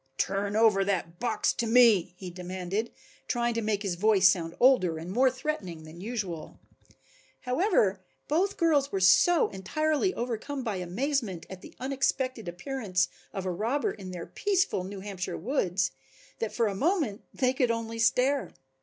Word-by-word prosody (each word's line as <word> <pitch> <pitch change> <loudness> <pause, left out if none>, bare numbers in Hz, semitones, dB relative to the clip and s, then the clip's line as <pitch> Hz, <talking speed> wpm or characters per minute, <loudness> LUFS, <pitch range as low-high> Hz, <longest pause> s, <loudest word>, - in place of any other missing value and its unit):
"Turn 200 +1 -1
over 215 -3 +4
that 175 -4 -2
box 245 - +1
to 235 - -2
me," 220 -7 +5
he 185 -1 -7
demanded, 185 +4 -4 0.4
trying 240 -1 0
to 230 - -1
make 210 -1 -1
his 195 -3 -1
voice 195 +1 +4
sound 170 -3 +1
older 215 -11 +4
and 165 +3 -6
more 255 +6 +4
threatening 255 - -4
than 160 +2 -11
usual. 195 -8 -5 0.8
However, 250 - +2 0.3
both 370 +7 +1
girls 295 -5 +2
were 195 - -1
so 190 - +5
entirely 310 - 0
overcome 250 +3 -3
by 220 -5 -2
amazement 195 - -2
at 185 -1 -8
the - - -13
unexpected 260 -3 -1
appearance 180 -1 -1 0.2
of 190 -1 -5
a 185 - -1
robber 230 +11 -1
in 190 -3 -9
their 175 -2 -6
peaceful 380 - 0
New 195 +1 -7
Hampshire 190 -3 -5
woods, 185 - 0 0.5
that 225 - -2
for 235 - +1
a 205 - 0
moment 280 - 0
they 255 -1 +1
could 255 -2 +1
only 230 0 -2
stare. 255 +5 +2
215 Hz, 160 wpm, -28 LUFS, 185-260 Hz, 0.8 s, me